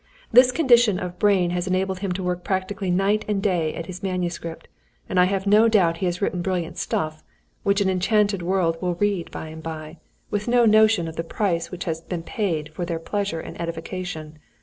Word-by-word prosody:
This 250 +2 +7
condition 240 - +4
of 180 -1 -6
brain 190 -4 +3
has 180 +1 -2
enabled 185 0 0
him 195 -1 -2
to 185 +1 -4
work 180 0 -2
practically 190 0 -2
night 195 +4 +2
and 210 -2 0
day 175 -6 0
at 165 - -5
his 185 +1 -8
manuscript, 175 -3 -4 0.4
and 185 - +1
I 180 - +7
have 195 +1 -1
no 210 +3 +6
doubt 180 -7 +3
he 185 - -1
has 175 +3 -2
written 180 -2 0
brilliant 180 -2 -2
stuff, 155 0 -2 0.4
which 200 0 +2
an 200 - +2
enchanted 200 +1 +2
world 170 -2 0
will 180 -1 -1
read 200 -1 0
by 160 - -7
and 160 0 -9
by, 155 0 -7 0.3
with 210 +2 -2
no 240 0 +4
notion 215 -5 +5
of 160 - -8
the 165 - -1
price 170 -1 -1
which 180 -1 -6
has 165 -1 -3
been 170 0 -5
paid 160 -7 -2
for 175 - -4
their 170 -1 -2
pleasure 195 0 -2
and - - -8
edification. 165 -2 -5
185 Hz, 205 wpm, -23 LUFS, 170-200 Hz, 0.4 s, This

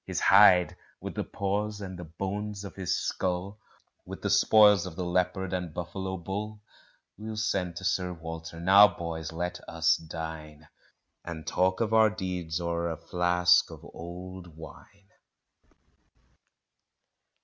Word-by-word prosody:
His - - -3
hide, 95 -3 +6 0.2
with - - -6
the - - -2
paws 100 +1 -2
and 95 -3 -7
the - - -6
bones 100 +5 -5
of 100 - -8
his 95 -2 -1
skull, 95 +3 -2 0.4
With - - -9
the - - 0
spoils 105 -4 +5
of 85 - -9
the 90 - -3
leopard 90 +1 -1
and 90 -4 -4
buffalo 95 +2 -4
bull, 105 +4 -5 0.6
We'll 110 0 -6
send 95 -5 -1
to 95 - -7
Sir 90 -1 0
Walter 80 0 -8
now, 95 +4 +8
boys, 85 -3 -5
let 90 +2 -4
us 85 0 +2
dine, 80 -2 -8 0.6
And 80 -2 -7
talk 95 +2 +1
of 110 -1 0
our 110 -1 +6
deeds 90 -5 -4
o'er 85 0 -2
a 80 - -4
flask 90 +1 +3
of - - -11
old 90 0 -9
wine. 95 +5 -14
90 Hz, 140 wpm, -28 LUFS, 85-100 Hz, 0.6 s, now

